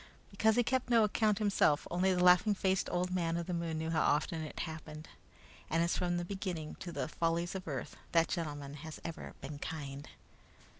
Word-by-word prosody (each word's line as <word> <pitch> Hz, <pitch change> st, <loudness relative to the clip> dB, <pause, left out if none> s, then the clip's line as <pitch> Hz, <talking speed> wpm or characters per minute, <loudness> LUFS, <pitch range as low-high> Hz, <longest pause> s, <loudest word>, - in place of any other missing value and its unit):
Because 220 Hz, +2 st, +3 dB
he 245 Hz, -, +4 dB
kept 260 Hz, +1 st, 0 dB
no 230 Hz, -2 st, +6 dB
account 210 Hz, 0 st, +2 dB
himself, 200 Hz, -8 st, +2 dB
only 180 Hz, +2 st, +2 dB
the 180 Hz, -1 st, +2 dB
laughing 180 Hz, +4 st, +6 dB
faced 190 Hz, -1 st, +1 dB
old 180 Hz, +1 st, 0 dB
man 170 Hz, -2 st, 0 dB
of 170 Hz, -, -2 dB
the 180 Hz, -, -3 dB
moon 170 Hz, -2 st, -2 dB
knew 160 Hz, +1 st, -2 dB
how 160 Hz, -1 st, +2 dB
often 155 Hz, +2 st, +1 dB
it 155 Hz, -, -5 dB
happened; 155 Hz, 0 st, -7 dB, 0.6 s
and 165 Hz, +1 st, +2 dB
as 170 Hz, -, +1 dB
from 175 Hz, -1 st, 0 dB
the 175 Hz, -, -2 dB
beginning, 180 Hz, -5 st, -4 dB
to 175 Hz, -, -6 dB
the -, -, -2 dB
follies 165 Hz, +2 st, 0 dB
of 190 Hz, -2 st, -6 dB
earth 135 Hz, -5 st, -4 dB, 0.2 s
that 165 Hz, -1 st, +4 dB
gentleman 145 Hz, -5 st, -3 dB
has 160 Hz, -1 st, -8 dB
ever 165 Hz, -1 st, -6 dB
been 145 Hz, +1 st, -6 dB
kind. 145 Hz, -3 st, -5 dB
170 Hz, 200 wpm, -33 LUFS, 160-190 Hz, 0.6 s, no